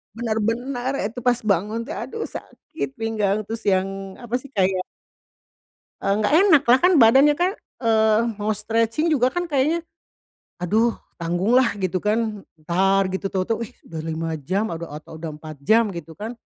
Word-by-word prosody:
benar-benar 240 Hz, +4 st, -1 dB
itu 220 Hz, +4 st, -4 dB
pas 245 Hz, 0 st, +2 dB
bangun 210 Hz, +3 st, 0 dB
tuh -, -, -8 dB
aduh 450 Hz, 0 st, -5 dB
sakit 275 Hz, -4 st, -7 dB
pinggang 215 Hz, -2 st, 0 dB
terus 225 Hz, +2 st, -6 dB
yang 195 Hz, 0 st, 0 dB
apa 240 Hz, +1 st, -2 dB
sih 280 Hz, -, -12 dB
kayak 185 Hz, -1 st, +1 dB, 1.2 s
Enggak 205 Hz, +6 st, +1 dB
enak 325 Hz, -5 st, +6 dB
lah 245 Hz, +2 st, +6 dB
kan 360 Hz, +1 st, +5 dB
badannya 270 Hz, +5 st, +6 dB
kan, 360 Hz, +2 st, +2 dB, 0.3 s
eee, 220 Hz, -2 st, +3 dB, 0.2 s
mau 210 Hz, -, -1 dB
stretching 225 Hz, +7 st, 0 dB
juga 255 Hz, -2 st, +3 dB
kan 355 Hz, +3 st, -2 dB
kayaknya, 315 Hz, +3 st, 0 dB, 0.8 s
aduh, 220 Hz, +6 st, +2 dB, 0.2 s
tanggung 175 Hz, +6 st, 0 dB
lah 255 Hz, -4 st, +4 dB
gitu 185 Hz, -2 st, -1 dB
kan 210 Hz, 0 st, -1 dB
entar 190 Hz, +5 st, +2 dB
gitu 190 Hz, +1 st, -2 dB
tahu-tahu, 195 Hz, +4 st, -1 dB
eh, -, -, -21 dB
udah 160 Hz, -1 st, -8 dB
5 165 Hz, 0 st, -3 dB
jam 190 Hz, +8 st, -1 dB
adao 165 Hz, 0 st, -5 dB
atau 155 Hz, +1 st, -10 dB
udah 160 Hz, -2 st, -6 dB
4 155 Hz, -1 st, -10 dB
jam 220 Hz, -1 st, +4 dB
gitu 165 Hz, -3 st, -8 dB
kan. 220 Hz, +3 st, -5 dB
220 Hz, 160 wpm, -23 LUFS, 190-245 Hz, 1.2 s, enak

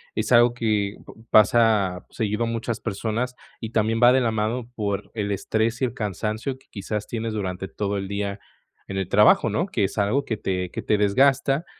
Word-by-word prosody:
es -, -, -2 dB
algo 120 Hz, 0 st, +5 dB
que 105 Hz, -3 st, 0 dB
p -, -, -12 dB, 0.2 s
pasa 105 Hz, -4 st, +3 dB
seguido 110 Hz, 0 st, -1 dB
a -, -, -3 dB
muchas 115 Hz, 0 st, -3 dB
personas 115 Hz, +4 st, -3 dB, 0.2 s
y 110 Hz, -, -5 dB
también 110 Hz, 0 st, +1 dB
va 120 Hz, -, +8 dB
de 130 Hz, -, +3 dB
la 115 Hz, -2 st, +1 dB
mano 110 Hz, +3 st, -2 dB
por 100 Hz, -2 st, -3 dB
el 105 Hz, -2 st, -2 dB
estrés 110 Hz, +4 st, -1 dB
y -, -, +3 dB
el 120 Hz, -, -4 dB
cansancio 110 Hz, +3 st, -3 dB
que 130 Hz, -, -27 dB
quizás 105 Hz, 0 st, -4 dB
tienes 115 Hz, -1 st, -4 dB
durante 95 Hz, -2 st, -3 dB
todo 100 Hz, +1 st, -3 dB
el 95 Hz, 0 st, -4 dB
día 100 Hz, 0 st, -3 dB, 0.5 s
en 95 Hz, -, -5 dB
el 95 Hz, -2 st, -2 dB
trabajo, 105 Hz, +2 st, +5 dB
¿no?, 165 Hz, -, 0 dB
que 115 Hz, -, -1 dB
es 95 Hz, -, -2 dB
algo 125 Hz, +8 st, +1 dB
que 110 Hz, -5 st, -2 dB
te 90 Hz, -3 st, -2 dB
que -, -, -5 dB
te 105 Hz, -, +1 dB
desgasta. 135 Hz, +8 st, +2 dB
110 Hz, 205 wpm, -24 LUFS, 100-120 Hz, 0.5 s, va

